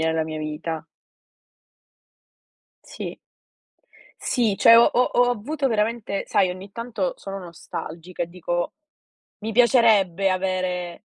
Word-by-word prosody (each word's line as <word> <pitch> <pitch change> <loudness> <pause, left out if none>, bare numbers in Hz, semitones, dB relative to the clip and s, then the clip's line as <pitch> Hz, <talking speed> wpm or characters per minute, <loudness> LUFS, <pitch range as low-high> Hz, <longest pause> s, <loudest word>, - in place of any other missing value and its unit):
nella 160 0 +1
mia 155 -1 -5
vita. 155 +1 -4 2.0
Sì. - - -7 1.0
Sì, 225 -6 +1
cioè 230 -2 +8
ho 235 - +8
ho 250 - +3
ho 245 0 +4
avuto 270 +5 -1
veramente 215 -2 -1
sai, 190 -2 +3
ogni 190 +2 -9
tanto 240 - -3
sono 195 - -7
nostalgica 170 0 -7
e 170 - -4
dico: 175 0 -3 0.7
“Mi 220 +2 -4
piacerebbe 215 -6 +4
avere 185 -1 -2
195 Hz, 115 wpm, -23 LUFS, 175-230 Hz, 2.0 s, cioè